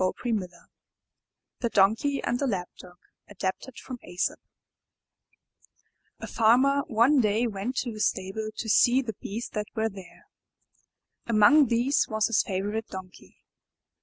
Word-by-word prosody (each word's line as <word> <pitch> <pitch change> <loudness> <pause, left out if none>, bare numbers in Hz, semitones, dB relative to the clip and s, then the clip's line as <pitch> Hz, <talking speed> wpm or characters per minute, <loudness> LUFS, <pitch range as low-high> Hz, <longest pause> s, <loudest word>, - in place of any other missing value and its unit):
no 185 - 0
IN 230 -2 +1
THE 185 -3 -5
NURSERY 175 -1 -21 0.9
THE 235 - -1
DONKEY 225 +8 +2
AND 240 +1 -1
THE 280 - 0
LAP 185 -7 -2
DOG 180 -1 -14 0.3
Adapted 205 +5 -5
from 255 -2 -8
Aesop 180 0 -3 1.8
A - - -6
Farmer 255 +5 +3
one 240 +6 +3
day 215 +2 +1
went 220 +3 -4
to 245 - -5
his 215 -1 +1
stable 195 +3 -4
to 225 - -4
see 245 +4 +4
the 225 -3 -5
beasts 225 +4 -5
that 210 -1 -3
were 220 0 0
there. 190 -4 -13 1.0
Among 235 +6 +5
these 240 +5 +1
was 215 -1 +1
his 230 - +2
favorite 205 +3 -3
Donkey. 185 -1 -12
220 Hz, 145 wpm, -26 LUFS, 195-245 Hz, 1.8 s, Among